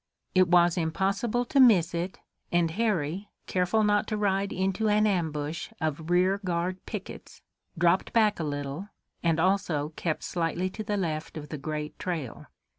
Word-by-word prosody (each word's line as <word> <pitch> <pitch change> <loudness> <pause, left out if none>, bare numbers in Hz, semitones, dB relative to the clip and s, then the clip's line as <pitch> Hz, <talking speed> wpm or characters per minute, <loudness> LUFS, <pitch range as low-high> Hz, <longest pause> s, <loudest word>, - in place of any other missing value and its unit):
It 185 -1 +5
was 175 0 +4
impossible 195 +8 0
to 275 - +1
miss 195 -10 +6
it, 175 +2 -3 0.3
and 175 -1 +2
Harry, 195 -2 -1 0.2
careful 185 +4 +1
not 210 +1 +2
to 215 - -2
ride 200 -1 +1
into 190 +3 0
an 210 +1 +4
ambush 160 -5 -1
of 160 0 -3
rear 185 +3 +3
guard 180 +1 -2
pickets, - - -8 0.3
dropped 175 +2 +2
back 215 -4 +3
a - - -1
little, 145 +5 -4 0.3
and 165 -2 +1
also 175 -5 +1
kept 160 -3 -2
slightly 175 +2 -1
to 215 - -5
the 210 0 -1
left 160 -4 -3
of 150 -1 -7
the 155 - -4
great 150 +1 -5
trail. 160 -10 -4
180 Hz, 160 wpm, -28 LUFS, 160-200 Hz, 0.3 s, miss